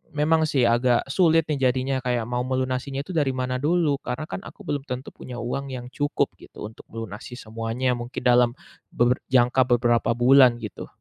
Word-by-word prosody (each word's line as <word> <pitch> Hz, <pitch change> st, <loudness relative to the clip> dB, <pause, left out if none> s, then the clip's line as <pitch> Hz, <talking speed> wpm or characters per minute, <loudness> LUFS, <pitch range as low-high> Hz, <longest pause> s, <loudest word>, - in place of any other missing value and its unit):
memang 160 Hz, +2 st, +3 dB
sih 135 Hz, -5 st, +1 dB
agak 120 Hz, +2 st, +2 dB
sulit 165 Hz, -2 st, +4 dB
nih 135 Hz, -3 st, +2 dB
jadinya, 130 Hz, +1 st, -1 dB
kayak 120 Hz, -2 st, 0 dB
mau 125 Hz, 0 st, -1 dB
melunasinya 130 Hz, +1 st, -2 dB
itu -, -, -8 dB
dari 145 Hz, -4 st, +2 dB
mana 130 Hz, 0 st, -2 dB
dulu. 155 Hz, -2 st, +2 dB
Karena 135 Hz, +5 st, -4 dB
kan -, -, -4 dB
aku 210 Hz, -, -13 dB
belum 145 Hz, -2 st, -2 dB
tentu 125 Hz, 0 st, -5 dB
punya 125 Hz, -1 st, -9 dB
uang 135 Hz, +3 st, -3 dB
yang 125 Hz, 0 st, -7 dB
cukup 145 Hz, 0 st, 0 dB
gitu, -, -, -12 dB
untuk 110 Hz, -, -15 dB
melunasi 115 Hz, +2 st, -7 dB
semuanya, 115 Hz, +3 st, -2 dB
mungkin 120 Hz, +2 st, -6 dB
dalam 120 Hz, -1 st, +5 dB, 0.4 s
beber 120 Hz, +1 st, +2 dB
jangka 130 Hz, +1 st, +4 dB
beberapa 120 Hz, -1 st, +2 dB
bulan 125 Hz, 0 st, +6 dB
gitu. 110 Hz, -, -7 dB
125 Hz, 180 wpm, -24 LUFS, 120-140 Hz, 0.4 s, bulan